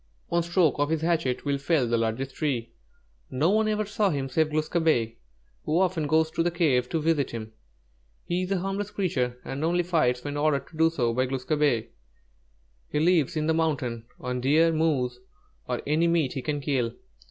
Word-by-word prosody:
One 170 Hz, 0 st, +2 dB
stroke 170 Hz, -3 st, +2 dB
of 145 Hz, 0 st, +1 dB
his 160 Hz, -1 st, 0 dB
hatchet 160 Hz, -7 st, 0 dB
will 140 Hz, -1 st, 0 dB
fell 140 Hz, -1 st, +2 dB
the 120 Hz, -, +1 dB
largest 115 Hz, +4 st, -1 dB
tree. 120 Hz, -6 st, -2 dB, 0.6 s
No 150 Hz, +8 st, +1 dB
one 215 Hz, +1 st, +2 dB
ever 215 Hz, 0 st, 0 dB
saw 205 Hz, 0 st, +1 dB
him 140 Hz, -5 st, -2 dB
save 155 Hz, +3 st, +1 dB
Glūs 155 Hz, 0 st, -1 dB
kābé, 155 Hz, -10 st, +1 dB, 0.5 s
who 155 Hz, +3 st, +1 dB
often 175 Hz, -5 st, +1 dB
goes 160 Hz, +1 st, +2 dB
to -, -, -1 dB
the 170 Hz, -, +2 dB
cave 145 Hz, -8 st, +1 dB
to 165 Hz, -, 0 dB
visit 155 Hz, -3 st, +1 dB
him. 110 Hz, -1 st, -7 dB, 0.7 s
He 175 Hz, +1 st, -1 dB
is 185 Hz, -, -3 dB
a 195 Hz, -, +2 dB
harmless 195 Hz, +2 st, -3 dB
creature, 130 Hz, -12 st, -1 dB
and 140 Hz, +3 st, -4 dB
only 175 Hz, +2 st, +2 dB
fights 125 Hz, -8 st, +1 dB
when 145 Hz, 0 st, -4 dB
ordered 145 Hz, -2 st, +1 dB
to 160 Hz, -, -14 dB
do 160 Hz, 0 st, +5 dB
so 120 Hz, -8 st, 0 dB
by 130 Hz, +2 st, +1 dB
Glūs 130 Hz, 0 st, -4 dB
kābé. 145 Hz, -7 st, +1 dB, 1.0 s
He 150 Hz, -, 0 dB
lives 165 Hz, -3 st, +2 dB
in 155 Hz, -, 0 dB
that 160 Hz, -, +2 dB
mountain, 135 Hz, -8 st, -1 dB
on 125 Hz, 0 st, -3 dB
deer, 160 Hz, +5 st, +4 dB
moose, 135 Hz, -6 st, 0 dB, 0.5 s
or -, -, -2 dB
any 155 Hz, +4 st, +2 dB
meat 165 Hz, -6 st, +1 dB
he 135 Hz, -, -3 dB
can 145 Hz, +1 st, -2 dB
kill. 130 Hz, -5 st, -1 dB
150 Hz, 200 wpm, -26 LUFS, 130-165 Hz, 1.0 s, do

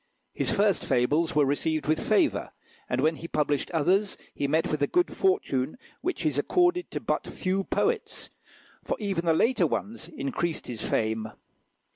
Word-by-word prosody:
His -, -, 0 dB
first 200 Hz, -3 st, +2 dB
fables 150 Hz, +7 st, +1 dB
were 150 Hz, -1 st, +5 dB
received 155 Hz, +3 st, 0 dB
with 155 Hz, +1 st, +1 dB
favour, -, -, +1 dB, 0.4 s
and 125 Hz, +1 st, 0 dB
when 155 Hz, +2 st, +2 dB
he 170 Hz, -, -7 dB
published 150 Hz, -3 st, 0 dB
others 185 Hz, +5 st, +1 dB, 0.2 s
he 140 Hz, -, -1 dB
met 160 Hz, +4 st, +1 dB
with 155 Hz, -1 st, -1 dB
a 145 Hz, -, +3 dB
good 355 Hz, 0 st, +1 dB
fortune 250 Hz, -, 0 dB, 0.2 s
which 365 Hz, -, -2 dB
is 145 Hz, -2 st, +1 dB
accorded 355 Hz, -, +2 dB
to -, -, -4 dB
but -, -, -2 dB
few 190 Hz, +1 st, -2 dB
poets, 455 Hz, 0 st, -1 dB, 0.5 s
for -, -, -2 dB
even 195 Hz, -5 st, -2 dB
the 165 Hz, -, +5 dB
later 245 Hz, +9 st, +3 dB
ones 210 Hz, -6 st, -4 dB
increased 160 Hz, +2 st, -3 dB
his 120 Hz, -3 st, -6 dB
fame. 110 Hz, 0 st, 0 dB
160 Hz, 165 wpm, -27 LUFS, 145-205 Hz, 0.5 s, were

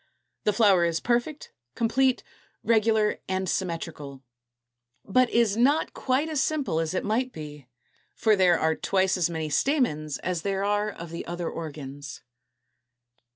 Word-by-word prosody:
The 210 Hz, -, +3 dB
flower 200 Hz, -4 st, +4 dB
is 165 Hz, -1 st, +1 dB
perfect, 245 Hz, +5 st, -1 dB, 0.2 s
complete, 250 Hz, +3 st, +1 dB, 0.4 s
regular, 220 Hz, -1 st, +2 dB
and 190 Hz, 0 st, -1 dB
symmetrical, 165 Hz, -7 st, -4 dB, 0.8 s
but 250 Hz, +4 st, +3 dB
is 230 Hz, -3 st, +2 dB
not 275 Hz, +7 st, +2 dB
quite 265 Hz, +4 st, 0 dB
as 310 Hz, -4 st, 0 dB
simple 280 Hz, -, 0 dB
as 165 Hz, +2 st, -2 dB
it -, -, -1 dB
might 245 Hz, +5 st, 0 dB
be; 150 Hz, -, -9 dB, 0.5 s
for 220 Hz, -2 st, +3 dB
there 180 Hz, -3 st, +4 dB
are 160 Hz, 0 st, +2 dB
twice 190 Hz, +2 st, +1 dB
as 175 Hz, -3 st, +1 dB
many 160 Hz, -2 st, -4 dB
stamens 155 Hz, -, 0 dB
as 180 Hz, -2 st, -3 dB
there 195 Hz, +2 st, -1 dB
are 205 Hz, +1 st, +1 dB
of 170 Hz, -5 st, -9 dB
the 170 Hz, -, -5 dB
other 175 Hz, 0 st, -4 dB
organs. 145 Hz, -5 st, -8 dB
190 Hz, 145 wpm, -26 LUFS, 165-235 Hz, 0.8 s, flower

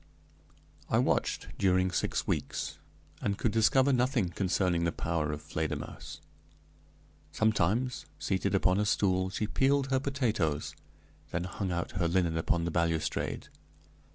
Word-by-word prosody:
I -, -, +3 dB
watched -, -, +1 dB
during 95 Hz, -1 st, +3 dB
six -, -, -1 dB
weeks, -, -, -2 dB, 0.4 s
and 100 Hz, -1 st, -1 dB
could 115 Hz, -, +1 dB
discover 130 Hz, +5 st, +4 dB
nothing 125 Hz, -6 st, +2 dB
concerning 90 Hz, -2 st, +1 dB
the 85 Hz, -, +1 dB
power 80 Hz, -3 st, -1 dB
of 75 Hz, 0 st, -5 dB
Fledermausse. 75 Hz, 0 st, -4 dB, 1.1 s
Sometimes, 110 Hz, +3 st, +1 dB
seated 95 Hz, 0 st, 0 dB
upon 95 Hz, 0 st, +3 dB
a 105 Hz, -, +2 dB
stool, 95 Hz, -2 st, +2 dB
she 95 Hz, +3 st, -2 dB
peeled 135 Hz, +4 st, +1 dB
her 130 Hz, -, +3 dB
potatoes, 115 Hz, -, -1 dB, 0.6 s
then 85 Hz, -, -2 dB
hung 95 Hz, +1 st, -3 dB
out 85 Hz, 0 st, -2 dB
her 85 Hz, -2 st, +2 dB
linen 85 Hz, -1 st, +1 dB
upon 85 Hz, +1 st, +1 dB
the 85 Hz, -, -1 dB
balustrade. 80 Hz, -2 st, -1 dB
95 Hz, 130 wpm, -30 LUFS, 85-110 Hz, 1.1 s, discover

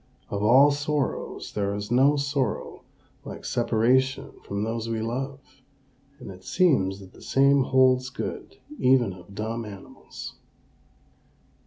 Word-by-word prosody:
Of 100 Hz, -, -2 dB
all 130 Hz, +7 st, +6 dB
sorrows 145 Hz, 0 st, -2 dB
there 100 Hz, -1 st, -1 dB
is 105 Hz, +2 st, -5 dB
no 135 Hz, +4 st, +5 dB
sorrow 140 Hz, -2 st, -2 dB, 0.4 s
like -, -, -9 dB
separation 125 Hz, +3 st, +1 dB
from 100 Hz, +1 st, -3 dB
those 115 Hz, +1 st, -3 dB
we 115 Hz, -1 st, -1 dB
love; 135 Hz, +4 st, -5 dB, 0.6 s
and 125 Hz, -8 st, -9 dB
it 95 Hz, 0 st, -13 dB
seems 100 Hz, -, +2 dB
that 95 Hz, -1 st, -14 dB
the -, -, -16 dB
same 140 Hz, 0 st, +3 dB
holds 130 Hz, -1 st, +3 dB
good 130 Hz, -, -6 dB, 0.2 s
even 125 Hz, -6 st, +3 dB
of 95 Hz, +2 st, -14 dB
dumb 115 Hz, +3 st, -3 dB
animals. 100 Hz, -3 st, -10 dB
125 Hz, 130 wpm, -26 LUFS, 105-135 Hz, 0.6 s, all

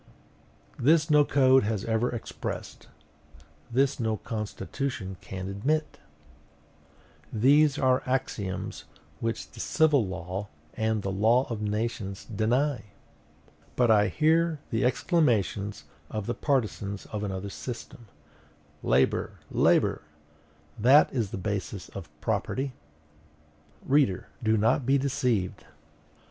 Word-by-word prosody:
This 150 Hz, +3 st, +4 dB
no 150 Hz, -1 st, +7 dB
code 135 Hz, -2 st, +5 dB
has 105 Hz, -1 st, -2 dB
ever 115 Hz, +2 st, +1 dB
expressed; 120 Hz, -, -6 dB, 0.8 s
this 135 Hz, +3 st, +1 dB
no 110 Hz, -2 st, 0 dB
constitution 110 Hz, -1 st, -4 dB
can 95 Hz, 0 st, -6 dB
admit! 145 Hz, +11 st, -1 dB, 1.3 s
These 140 Hz, +6 st, +4 dB
are 130 Hz, 0 st, +3 dB
axioms 110 Hz, -7 st, -3 dB, 0.3 s
which 115 Hz, 0 st, -3 dB
the 115 Hz, -, -13 dB
civil 150 Hz, -1 st, +3 dB
law 95 Hz, +2 st, -5 dB, 0.3 s
and 110 Hz, -2 st, -1 dB
the 95 Hz, -, -2 dB
law 115 Hz, +7 st, +3 dB
of 110 Hz, -2 st, -3 dB
nations 105 Hz, -2 st, -3 dB
deny!..... 120 Hz, +3 st, 0 dB, 0.9 s
But 120 Hz, -2 st, +4 dB
I 105 Hz, -1 st, +5 dB
hear 160 Hz, +2 st, +2 dB
the 115 Hz, -, +1 dB
exclamations 110 Hz, -, +1 dB, 0.3 s
of 110 Hz, -2 st, -4 dB
the 120 Hz, -, -1 dB
partisans 105 Hz, -8 st, -1 dB
of 105 Hz, -1 st, -3 dB
another 100 Hz, 0 st, -4 dB
system: 120 Hz, 0 st, -8 dB, 0.7 s
"Labor, 65 Hz, +2 st, +1 dB
labor! -, -, +3 dB, 0.8 s
that 130 Hz, +7 st, +6 dB
is 115 Hz, -7 st, -1 dB
the -, -, -5 dB
basis 100 Hz, 0 st, -4 dB
of 90 Hz, -5 st, -9 dB
property!" 135 Hz, 0 st, -1 dB, 1.1 s
Reader, 135 Hz, -9 st, +2 dB
do 110 Hz, -1 st, +2 dB
not 115 Hz, +6 st, +2 dB
be 135 Hz, +3 st, +3 dB
deceived. 125 Hz, -8 st, -1 dB
115 Hz, 110 wpm, -27 LUFS, 100-135 Hz, 1.3 s, no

